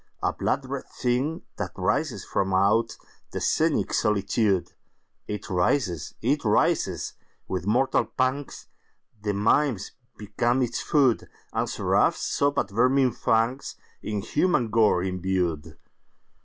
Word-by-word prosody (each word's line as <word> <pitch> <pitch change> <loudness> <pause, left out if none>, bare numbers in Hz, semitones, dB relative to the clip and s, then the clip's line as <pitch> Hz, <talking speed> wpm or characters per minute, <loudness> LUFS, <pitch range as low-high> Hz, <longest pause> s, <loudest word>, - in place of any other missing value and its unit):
A - - +1
blood 135 0 -1
red 135 +1 -5
thing 130 +6 -1
that - - -4
writhes - - -1
from 95 - -1
outThe 105 +5 +2 0.4
scenic - - +1
solitude! 100 -2 +1 0.5
It 105 -1 -5
writhes!—it 95 - 0
writhes!—with 100 -3 -1
mortal 130 +5 +2
pangsThe 130 -5 -4
mimes 110 +1 +1 0.3
become 120 +5 0
its 120 -1 -2
food, 135 -6 +2 0.2
And - - -1
seraphs - - +2
sob 140 0 0
at 100 - 0
vermin 130 +4 +3
fangsIn 115 -3 -2
human 145 -9 +1
gore 105 -5 +3
imbued. 90 -4 -2
115 Hz, 100 wpm, -26 LUFS, 100-130 Hz, 0.5 s, vermin